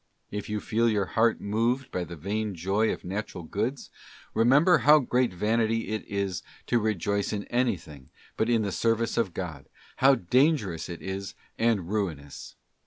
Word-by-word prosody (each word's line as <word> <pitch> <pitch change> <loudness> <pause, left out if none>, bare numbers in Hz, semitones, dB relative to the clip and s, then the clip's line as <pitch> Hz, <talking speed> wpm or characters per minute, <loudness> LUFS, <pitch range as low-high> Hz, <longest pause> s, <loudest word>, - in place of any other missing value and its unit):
If 105 0 -5
you 105 0 -1
feel 115 +2 +1
your 105 -3 +1
heart 115 0 +3
moved 120 +5 0
by 90 -1 -2
the 85 +1 -8
vain 100 +5 -3
joy 95 +6 +1
of - - -6
Natural 95 -1 -4
Goods, 115 - -3 0.4
remember 140 +10 +5
how 150 +1 +7
great 125 -4 +1
vanity 110 +4 0
it 110 0 -2
is 100 -3 -2 0.2
to 120 - +2
rejoice 100 -1 0
in 100 -1 -2
anything 85 - -2 0.3
but 110 - 0
in 115 -2 +3
the 100 - -2
service 115 +3 0
of 100 -7 0
God, 80 -7 -6 0.3
how 135 +1 +6
dangerous 120 - +1
it 85 - -7
is 95 0 -5 0.2
and 110 -7 +2
ruinous. 85 -9 -4
105 Hz, 165 wpm, -27 LUFS, 95-115 Hz, 0.4 s, how